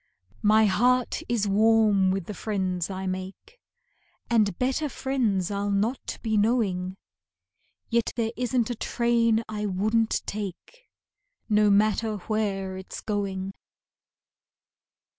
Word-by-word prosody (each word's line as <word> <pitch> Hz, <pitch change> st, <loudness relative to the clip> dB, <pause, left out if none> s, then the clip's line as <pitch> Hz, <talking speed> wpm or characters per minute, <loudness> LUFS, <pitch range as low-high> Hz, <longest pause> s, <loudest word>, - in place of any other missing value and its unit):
My 215 Hz, +1 st, +5 dB
heart 245 Hz, +5 st, +2 dB
is 225 Hz, -4 st, +1 dB
warm 210 Hz, -1 st, +4 dB
with 190 Hz, -2 st, -1 dB
the 210 Hz, -, -6 dB
friends 185 Hz, -4 st, -2 dB
I 190 Hz, 0 st, -4 dB
make, 185 Hz, -, -6 dB, 0.7 s
And 210 Hz, -6 st, +3 dB
better 265 Hz, +4 st, 0 dB
friends 230 Hz, -9 st, -1 dB
I'll 200 Hz, 0 st, -1 dB
not 210 Hz, +6 st, -1 dB
be 220 Hz, -2 st, +1 dB
knowing; 195 Hz, -5 st, +1 dB, 0.9 s
Yet 235 Hz, -1 st, +1 dB
there 225 Hz, -2 st, -1 dB
isn't 245 Hz, -1 st, 0 dB
a -, -, -2 dB
train 230 Hz, -1 st, +1 dB
I 210 Hz, -1 st, -3 dB
wouldn't 215 Hz, +4 st, +1 dB
take, 210 Hz, -, -7 dB, 0.6 s
No 210 Hz, -1 st, +4 dB
matter 215 Hz, +2 st, +2 dB
where 195 Hz, -2 st, -2 dB
it's 190 Hz, -, -8 dB
going. 195 Hz, -2 st, -3 dB
210 Hz, 115 wpm, -26 LUFS, 195-230 Hz, 0.9 s, My